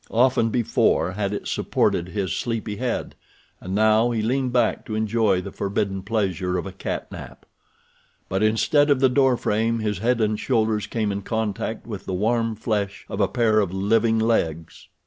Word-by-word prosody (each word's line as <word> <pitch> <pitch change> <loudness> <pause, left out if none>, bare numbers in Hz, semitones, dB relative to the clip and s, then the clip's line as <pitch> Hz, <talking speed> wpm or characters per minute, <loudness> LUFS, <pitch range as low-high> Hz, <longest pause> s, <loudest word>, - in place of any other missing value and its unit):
Often 120 -1 +3
before 115 -5 +1
had 100 +1 -2
it 105 - -4
supported 85 +1 0
his 95 -2 -2
sleepy 115 -3 -3
head, 125 +1 -3 0.5
and 95 +1 -5
now 110 +2 +4
he 115 -3 -1
leaned 130 +2 0
back 120 -3 +1
to 110 - -3
enjoy 110 -3 +1
the - - -7
forbidden 100 -1 -2
pleasure 95 -3 -1
of 90 - -3
a 95 - -6
cat 95 - -5
nap. - - -10 0.8
But 95 +1 -1
instead 145 +8 +3
of 140 -2 +4
the 130 0 +4
door 130 -1 +3
frame 115 +2 0
his 105 -3 -2
head 120 +3 +1
and 110 -1 0
shoulders 110 -4 0
came 110 -3 -1
in 100 0 -3
contact 110 0 -3
with 105 -4 -7
the 95 - -2
warm 115 +3 0
flesh 105 -2 -3
of 100 - -5
a 100 - +4
pair 110 -2 +2
of 100 -4 0
living 110 +4 +2
legs. 85 -8 -1
110 Hz, 180 wpm, -23 LUFS, 100-115 Hz, 0.8 s, now